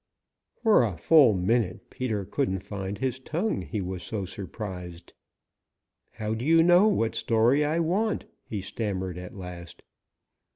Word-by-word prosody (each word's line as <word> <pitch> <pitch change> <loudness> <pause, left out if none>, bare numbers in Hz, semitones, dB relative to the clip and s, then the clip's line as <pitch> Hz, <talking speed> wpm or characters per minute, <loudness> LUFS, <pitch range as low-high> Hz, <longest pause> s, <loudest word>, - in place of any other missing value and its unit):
For 220 - +5
a 100 -7 -2
full 130 - +6
minute 95 +1 0
Peter 110 -6 -2
couldn't 95 -4 -1
find 100 -1 -5
his 130 -1 -2
tongue, 165 - -2
he 100 +3 -4
was 90 -1 -4
so 100 0 -4
surprised. 90 -2 -7 1.0
"How 110 -1 -3
do 110 +2 -4
you 165 +3 +5
know 175 +4 +6
what 115 - +1
story 120 +6 +3
I 150 +2 0
want?" 190 +6 0 0.2
he 105 -3 -5
stammered 95 -3 -3
at 90 +1 -9
last. 90 -2 -9
110 Hz, 140 wpm, -27 LUFS, 95-140 Hz, 1.0 s, full